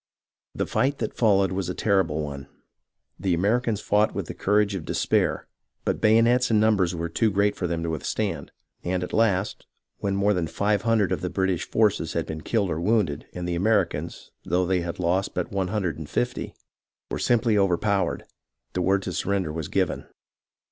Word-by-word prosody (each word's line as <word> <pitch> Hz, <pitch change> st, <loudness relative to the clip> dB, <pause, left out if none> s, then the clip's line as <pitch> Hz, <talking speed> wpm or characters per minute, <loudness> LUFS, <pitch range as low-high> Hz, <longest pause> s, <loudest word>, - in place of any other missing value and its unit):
The -, -, -1 dB
fight 140 Hz, +2 st, 0 dB
that -, -, -3 dB
followed 100 Hz, -4 st, +3 dB
was 95 Hz, 0 st, -2 dB
a -, -, -3 dB
terrible 95 Hz, -7 st, +1 dB
one. 70 Hz, -1 st, -6 dB, 0.7 s
The 90 Hz, -1 st, +1 dB
Ameri 110 Hz, +7 st, +2 dB
cans 110 Hz, -3 st, -1 dB
fought 105 Hz, +1 st, +2 dB
with -, -, -2 dB
the -, -, -6 dB
courage 105 Hz, 0 st, +2 dB
of 95 Hz, -4 st, -4 dB
despair, -, -, 0 dB, 0.4 s
but -, -, -1 dB
bayonets 115 Hz, +3 st, +4 dB
and 110 Hz, -2 st, +4 dB
numbers 100 Hz, -5 st, +2 dB
were 85 Hz, 0 st, -2 dB
too 110 Hz, +6 st, +1 dB
great 100 Hz, +1 st, +1 dB
for 90 Hz, -, -2 dB
them 85 Hz, -1 st, -2 dB
to 85 Hz, -, -2 dB
withstand, 80 Hz, -, -3 dB, 0.3 s
and 90 Hz, +1 st, -1 dB
at 90 Hz, -, -6 dB
last, 105 Hz, -3 st, +1 dB, 0.3 s
when 100 Hz, -1 st, -1 dB
more 100 Hz, +1 st, +3 dB
than 90 Hz, -4 st, -1 dB
five 100 Hz, +4 st, 0 dB
hundred 110 Hz, -3 st, +2 dB
of -, -, -1 dB
the 90 Hz, -, -2 dB
British 95 Hz, -2 st, -1 dB
forces 105 Hz, -7 st, +1 dB
had 85 Hz, -, -1 dB
been 80 Hz, 0 st, -6 dB
killed 100 Hz, -1 st, 0 dB
or 80 Hz, +1 st, -2 dB
wounded 95 Hz, -7 st, +1 dB
and 90 Hz, 0 st, -4 dB
the 90 Hz, -, -1 dB
Americans, 85 Hz, -4 st, 0 dB
though 90 Hz, +2 st, +1 dB
they 90 Hz, 0 st, +1 dB
had 85 Hz, 0 st, -4 dB
lost 90 Hz, +2 st, 0 dB
but -, -, -2 dB
one 95 Hz, -2 st, -1 dB
hundred 90 Hz, -6 st, -2 dB
and 75 Hz, -, -7 dB
fifty, -, -, -2 dB, 0.6 s
were -, -, -2 dB
simply 120 Hz, -2 st, +2 dB
overpowered, 100 Hz, +1 st, +1 dB, 0.5 s
the 90 Hz, -, -1 dB
word 95 Hz, +2 st, +2 dB
to -, -, -4 dB
surrender 95 Hz, -5 st, -1 dB
was 80 Hz, -2 st, -4 dB
given. -, -, -1 dB
95 Hz, 190 wpm, -25 LUFS, 85-105 Hz, 0.7 s, bayonets